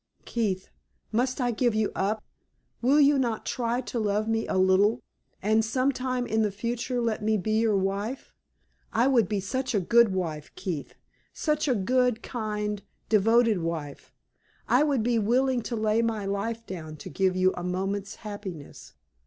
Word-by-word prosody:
Keith, 200 -6 -2 0.4
must 255 +4 0
I 245 -2 +1
give 235 0 +1
you 215 -1 +1
up? 210 +2 -1 0.6
Will 270 +5 +4
you 285 -1 +5
not 235 -4 -1
try 240 0 -1
to 245 - -4
love 210 0 0
me 225 0 0
a - - 0
little, 190 +5 +3 0.4
and 215 +2 +3
some 255 +5 +1
time 255 -1 -2
in 220 -1 +1
the 215 - +2
future 240 +4 -2
let 230 -3 -1
me 215 0 +2
be 215 +3 0
your 220 -3 +3
wife? 200 +6 -3 0.6
I 235 +3 +3
would 235 -8 +3
be 205 - 0
such 255 +5 -2
a - - +4
good 235 +4 +4
wife, 165 -5 -3
Keith 165 -7 -5 0.4
such 300 -1 0
a 255 - +3
good, 245 +3 +1
kind, 210 -3 -3 0.3
devoted 225 0 +4
wife! 160 -4 -5 0.6
I 250 - +4
would 285 -6 +2
be 235 0 +2
willing 250 +4 +2
to 235 - -4
lay 215 0 +2
my 225 -3 -1
life 220 +4 -3
down 160 -4 -7
to 150 - -9
give 190 +4 +1
you 185 0 +3
a 175 - -6
moment's 195 +2 -2
happiness. 195 -8 -8
220 Hz, 170 wpm, -27 LUFS, 195-240 Hz, 0.6 s, you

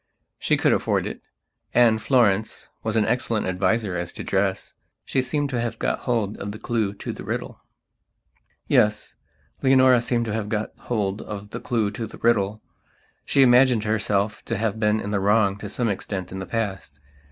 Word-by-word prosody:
She - - +2
could - - +3
afford - - 0
it, - - -6 0.5
and 115 -2 +5
Florence 110 -4 +1
was 110 0 -2
an 110 -2 +3
excellent 115 -2 0
adviser 95 +2 0
as 85 0 -3
to - - -7
dress. 95 0 -1 0.3
She 130 - +1
seemed 140 +2 -1
to 120 -2 -1
have 120 -1 -3
got - - -1
hold 110 -4 0
of 100 - -5
the - - -7
clue 110 -3 -1
to - - -5
the - - -9
riddle. - - -5 1.1
Yes, 105 0 +2 0.5
Leonora 130 -2 +5
seemed 120 0 0
to 110 - -3
have 110 -2 -3
got 110 0 -2
hold 105 -4 -2
of 105 0 -8
the 120 - -5
clue 110 -5 -1
to 110 +2 -5
the - - -12
riddle. 110 -2 +1 0.6
She 135 - +4
imagined 125 -2 +5
herself 105 -1 0
to - - -2
have 110 0 -1
been 105 0 +2
in 105 - -4
the 100 - +1
wrong 100 0 +3
to 105 - -6
some 120 +3 -1
extent 95 -2 -4
in 95 - -5
the 95 - -6
past. 95 -10 -4
110 Hz, 185 wpm, -24 LUFS, 100-120 Hz, 1.1 s, and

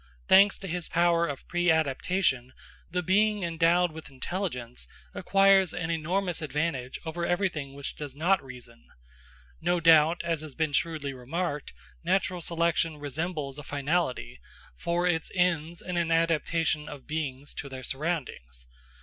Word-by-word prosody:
Thanks 200 +1 +6
to 195 - -8
his 175 -1 -3
power 170 0 +3
of 140 -2 -6
preadaptation, 160 -5 +1 0.4
the 180 +1 -1
being 210 +3 +2
endowed 170 +1 +3
with 160 -1 -10
intelligence 130 - -4 0.3
acquires 195 -2 +4
an 170 -1 -2
enormous 175 +2 -1
advantage 150 -3 -2
over 165 +2 -3
everything 170 -7 -1
which 140 -1 -5
does 145 -3 -7
not 175 +4 +2
reason. 125 -3 -12 0.7
No 175 0 +1
doubt, 165 0 +5
as 165 -2 -1
has 155 -3 -9
been 160 -2 0
shrewdly 155 -3 -1
remarked, 145 +4 -3 0.3
natural 185 0 0
selection 165 -1 0
resembles 145 0 -4
a - - -8
finality, 140 - -1 0.4
for 170 - -1
it 165 -2 0
ends 170 -2 +1
in 180 -1 -3
an 170 -1 +1
adaptation 165 -2 +1
of 145 -3 -9
beings 145 -3 -4
to 140 - -6
their 130 -1 -7
surroundings. 130 - -4
165 Hz, 140 wpm, -28 LUFS, 145-175 Hz, 0.7 s, Thanks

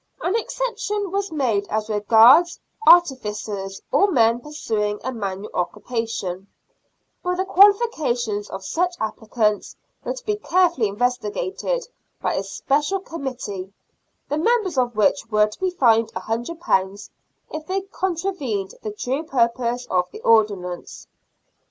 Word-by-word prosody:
An 370 - -1
exception 420 -4 -2
was 395 -1 -2
made 235 -10 0
as 215 0 -2
regards 225 - +5 0.3
artificers 210 - +3
or 405 - +4
men 230 -7 +3
pursuing 220 -8 -3
a 260 - -2
manual 200 -2 -5
occupation, 200 -1 -3 0.7
but 360 0 -1
the 375 +1 -1
qualifications 315 - +3
of 190 0 -7
such 355 - 0
applicants 215 -1 -1 0.3
were - - -3
to - - -11
be 420 -1 0
carefully 350 - +2
investigated 245 - -2 0.3
by - - -1
a - - 0
special 290 - -1
committee, 255 - -6 0.6
the 295 - -1
members 425 -2 +1
of 245 -3 0
which 210 0 +2
were 210 -1 +4
to 210 - -9
be 375 - +1
fined 230 -10 +3
£100 220 - -2 0.4
if 310 0 -6
they 385 +1 -1
contra 380 -1 -2
vened 220 - -4
the 215 - -4
true 250 +7 -2
purpose 245 -4 0
of 180 -1 +1
the 215 - -11
ordinance. 200 -6 +1
245 Hz, 130 wpm, -22 LUFS, 210-350 Hz, 0.7 s, regards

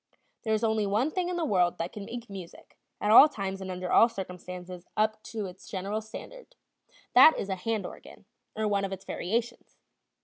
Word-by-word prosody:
There 220 -2 +1
is 215 - -2
only 220 -2 +1
one 220 +10 +1
thing 360 0 -1
in 360 - -2
the 340 -2 -1
world 180 -8 +2
that 170 +2 -4
can 205 -2 -7
make 240 +1 -7
music, 190 -4 -11 0.2
at 210 - +1
all 285 +7 +10
times 195 -6 -4
and 190 - -6
under 180 0 -4
all 230 - +6
circumstances, 180 -3 -8
up 215 0 +1
to 220 -3 -4
its 185 0 -11
general 200 +3 -3
standard; - - -11 0.6
that 270 +5 +8
is 200 - -4
a 190 - 0
hand 220 +3 -2
organ, - - -11 0.3
or 215 0 0
one 200 -1 +1
of 195 - -3
its 190 0 -7
variations. 235 +6 -3
210 Hz, 200 wpm, -28 LUFS, 190-230 Hz, 0.6 s, all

